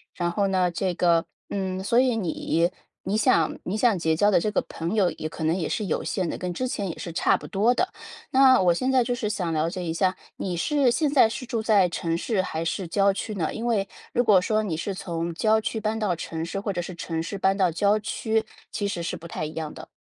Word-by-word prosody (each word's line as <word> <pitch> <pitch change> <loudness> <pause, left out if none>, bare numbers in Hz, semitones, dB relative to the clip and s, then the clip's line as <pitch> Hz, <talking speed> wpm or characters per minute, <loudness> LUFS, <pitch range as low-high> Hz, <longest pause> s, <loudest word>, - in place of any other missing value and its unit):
然 175 -1 -1
后 200 +2 +1
呢， 185 -2 +1
这 180 +1 -1
个， 170 -2 +3 0.3
嗯， 190 -1 -2
所 235 +4 +3
以 255 -2 +3
你 170 -3 0 0.3
你 200 - -1
想 165 -7 +3
你 195 +4 -2
想 220 -4 +3
结 160 -1 +1
交 205 +6 +3
的 - - +5
这 215 - 0
个 210 - 0
朋 170 +5 -3
友 195 -5 +3
也 155 - -5
可 160 - -7
能 160 +2 +2
也 175 -4 -2
是 215 - -1
有 175 - -1
限 185 -3 -1
的， - - -4
跟 180 -1 -3
之 255 - -1
前 200 -6 -3
也 165 - -6
是 170 - -6
差 - - +3
不 - - -11
多 210 +5 +2
的。 365 +8 0 0.4
那 260 -1 +6
我 180 -2 +4
现 255 +10 0
在 260 -2 +4
就 245 +1 -1
是 240 -4 -2
想 180 -5 -2
了 160 +1 +1
解 180 +1 -5
一 165 -2 -2
下 185 +2 +1 0.2
你 180 -2 -3
是 280 - +2
现 295 +6 +1
在 255 -6 +6
是 250 - -5
住 235 -2 -2
在 210 -4 +4
城 170 -1 -2
市 205 +2 0
还 165 -3 -3
是 175 +2 -2
郊 195 +3 +3
区 215 +2 -4
呢？ 165 -5 -1
因 230 +2 -3
为 205 -4 +1 0.2
如 245 - +2
果 200 -6 +5
说 215 +2 +1
你 185 -6 -2
是 190 +5 -3
从 170 -2 -3
郊 220 +4 +3
区 220 - -2
搬 220 +1 -1
到 205 -5 0
城 160 0 -5
市， 170 +4 -3
或 200 0 -3
者 175 - -2
是 180 +1 -7
城 165 -1 -3
市 200 +5 -5
搬 195 0 +2
到 190 -3 +2
郊 200 +5 +2
区， 220 +1 -1 0.3
其 205 - -2
实 175 -4 -3
是 170 - -3
不 170 -1 -9
太 155 - -4
一 155 - -6
样 155 -2 -4
的。 - - -10
190 Hz, 280 characters per minute, -25 LUFS, 170-220 Hz, 0.4 s, 那